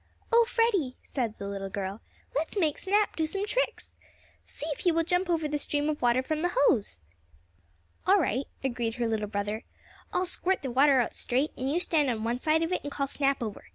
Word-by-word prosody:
"Oh, 470 0 +7
Freddie," 395 - +2
said 235 -5 -3
the 200 - -5
little 195 -1 -4
girl, 195 +2 -4 0.3
"let's 320 +8 -1
make 315 -6 +1
Snap 410 +2 +1
do 320 -1 0
some 395 +5 -1
tricks. - - -2 0.5
See - - -7
if 295 - -3
he 355 - +3
will 330 0 +2
jump 355 +2 +1
over 325 -3 +1
the 295 0 -1
stream 290 +1 0
of 300 - -2
water 245 +1 +3
from 310 +3 -2
the 355 +1 -1
hose." 205 - +2 1.0
"All 390 +2 +7
right," 265 - 0 0.2
agreed 240 -3 -1
her 240 -1 0
little 220 -2 -1
brother. 205 +2 -2 0.5
"I'll 365 - +1
squirt 365 -1 0
the 265 - -2
water 270 +1 +5
out 235 - -3
straight, 265 +5 0
and 260 +2 -2
you 335 - +2
stand 310 -5 +2
on 220 -3 -2
one 235 +2 -1
side 315 +3 +2
of 330 - -2
it 365 - 0
and 290 - -5
call 280 0 -1
Snap 275 -2 0
over. 215 -3 -6
285 Hz, 215 wpm, -28 LUFS, 235-335 Hz, 1.0 s, Oh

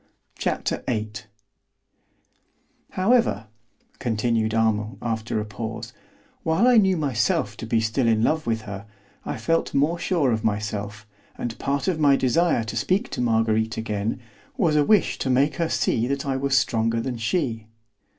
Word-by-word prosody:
Chapter - - -1
VIII 110 -3 -1 1.8
However 190 - +2 0.5
(continued 110 -1 0
Armand 110 0 +1
after 110 -1 -2
a 105 - -3
pause), 110 +1 -6 0.5
while 165 +9 +2
I 250 -2 +6
knew 190 -4 +4
myself 145 +3 0
to 115 - -6
be 115 0 +2
still 115 +3 0
in 110 -1 +3
love 155 +1 +1
with 110 -1 0
her, 100 0 -8 0.4
I - - -3
felt 165 -3 0
more 155 +5 +2
sure 165 -10 +1
of 110 -1 -1
myself, 105 -1 -3 0.3
and 120 -2 -4
part 140 +3 -1
of 175 -4 0
my 145 -2 +5
desire 135 0 +2
to 110 - -6
speak 195 +6 0
to - - -3
Marguerite 110 -1 +1
again 105 0 -2 0.4
was 165 -6 +2
a 150 - +4
wish 210 +5 +3
to - - -1
make 140 +3 +2
her 165 -1 0
see 115 +2 +1
that 140 +1 -2
I 135 -1 -1
was 135 +1 +1
stronger 115 -3 +1
than 125 +1 -3
she. 115 -3 -1
120 Hz, 160 wpm, -24 LUFS, 110-150 Hz, 1.8 s, I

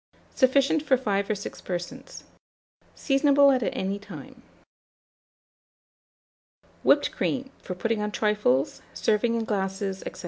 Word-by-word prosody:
Sufficient 275 +3 +3
for 275 -3 +2
5 200 -5 -1
or 215 - +1
6 205 - -8
persons. 190 +10 -6 0.7
Seasonable 280 0 +4
at 255 - -1
any 200 -2 -2
time. 205 0 -11 2.4
WHIPPED - - +3
CREAM, 265 0 -2
for 185 - -6
putting 220 +4 -1
on 210 0 -2
Trifles, 210 - +1
serving 230 +2 +1
in 230 - -1
Glasses, 195 -2 -2
&c. - - -14
215 Hz, 115 wpm, -26 LUFS, 195-265 Hz, 2.4 s, Seasonable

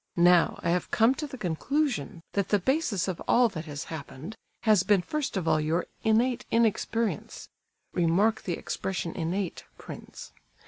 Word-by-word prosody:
Now, 175 0 +5
I - - +1
have 180 +1 0
come 230 +2 +4
to 300 +2 -5
the 265 - -8
conclusion 210 - -1
that 200 -1 0
the 205 - +4
basis 225 - 0
of 185 -3 -3
all 245 -1 +5
that 160 -5 -6
has 145 0 -5
happened, 160 +4 -8 0.3
has 215 -5 +5
been 190 -1 +3
first 295 - -2
of 175 -3 -2
all 155 -1 +3
your 160 +3 0 0.2
innate 235 +3 +2
inexperience 225 -3 0 0.4
(remark 185 +6 +2
the 180 - -3
expression 180 -1 -3
'innate,' 180 +2 -3
prince). - - -10
190 Hz, 155 wpm, -28 LUFS, 170-230 Hz, 0.4 s, Now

